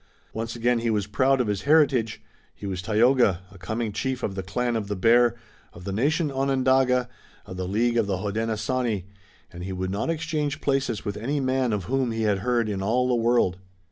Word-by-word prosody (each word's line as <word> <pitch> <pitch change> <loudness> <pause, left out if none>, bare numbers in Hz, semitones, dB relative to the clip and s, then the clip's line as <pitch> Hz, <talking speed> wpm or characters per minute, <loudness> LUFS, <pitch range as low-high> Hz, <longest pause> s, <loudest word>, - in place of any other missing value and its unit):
Once 115 +1 -4
again 120 0 +1
he 115 0 -1
was 105 -3 0
proud 130 +6 +2
of 125 - +2
his 105 -3 -2
heritage. 135 -7 +2 0.3
He - - -9
was 95 -2 -3
Tayoga, 110 -2 +3
a 100 - -14
coming 110 +4 -3
chief 130 +4 -3
of 100 - -1
the 95 - -3
Clan 120 +6 -2
of 110 -3 -2
the 105 - -2
Bear, 120 +5 +4 0.4
of 85 - -12
the 100 - -4
nation 145 - +1
Onondaga, 130 -2 +2 0.4
of 95 - -8
the 90 -1 -3
League 115 +5 +1
of 115 -3 +2
the 95 -2 0
Hodenosaunee, 110 +2 -1 0.5
and 90 0 -7
he 95 - -5
would 95 0 -3
not 100 +10 -2
exchange 155 -3 -2
places 135 -6 -1
with 100 - -3
any 135 +7 -1
man 130 -2 +1
of 105 -3 -1
whom 130 +5 0
he 115 0 -2
had 105 -3 +1
heard 120 +1 +1
in 100 -2 -3
all 120 +6 +1
the 125 - +1
world. 115 -6 +2
115 Hz, 205 wpm, -25 LUFS, 100-130 Hz, 0.5 s, Bear